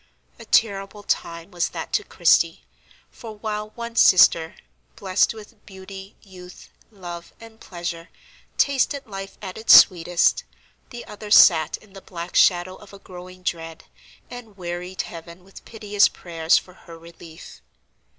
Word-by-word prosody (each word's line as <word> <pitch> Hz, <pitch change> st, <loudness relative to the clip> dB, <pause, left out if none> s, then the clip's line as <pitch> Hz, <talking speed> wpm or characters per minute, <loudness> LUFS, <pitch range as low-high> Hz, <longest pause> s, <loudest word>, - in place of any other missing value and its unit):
A -, -, -12 dB
terrible 200 Hz, -1 st, 0 dB
time 170 Hz, -3 st, -4 dB
was 175 Hz, -1 st, -2 dB
that -, -, -8 dB
to -, -, +1 dB
Christie; -, -, +1 dB, 0.5 s
for, 225 Hz, -2 st, -11 dB
while 210 Hz, 0 st, -5 dB
one 235 Hz, -1 st, -7 dB
sister, 170 Hz, -5 st, +5 dB, 0.4 s
blessed 190 Hz, +3 st, 0 dB
with 215 Hz, 0 st, -15 dB
beauty, 190 Hz, 0 st, -11 dB
youth, 180 Hz, -3 st, -14 dB, 0.2 s
love, 175 Hz, -5 st, -10 dB
and 225 Hz, -1 st, -15 dB
pleasure, 170 Hz, -2 st, -7 dB, 0.5 s
tasted 280 Hz, 0 st, 0 dB
life 195 Hz, -2 st, -9 dB
at 190 Hz, +1 st, -7 dB
its 220 Hz, -, +7 dB
sweetest, 175 Hz, -1 st, +1 dB, 0.5 s
the 240 Hz, -2 st, -10 dB
other 210 Hz, 0 st, -10 dB
sat 165 Hz, -6 st, +5 dB
in 210 Hz, -3 st, -22 dB
the 195 Hz, -, -12 dB
black 170 Hz, -1 st, -9 dB
shadow 180 Hz, 0 st, +3 dB
of 205 Hz, -1 st, -17 dB
a -, -, -11 dB
growing 185 Hz, -1 st, -13 dB
dread, 165 Hz, -2 st, -5 dB, 0.4 s
and 235 Hz, -5 st, -12 dB
wearied 180 Hz, +1 st, -5 dB
Heaven 170 Hz, +1 st, -12 dB
with 195 Hz, +1 st, -16 dB
piteous 210 Hz, -2 st, +1 dB
prayers 165 Hz, -2 st, 0 dB
for 180 Hz, -, -7 dB
her 170 Hz, -2 st, -14 dB
relief. 165 Hz, -, -14 dB
185 Hz, 140 wpm, -22 LUFS, 175-210 Hz, 0.5 s, its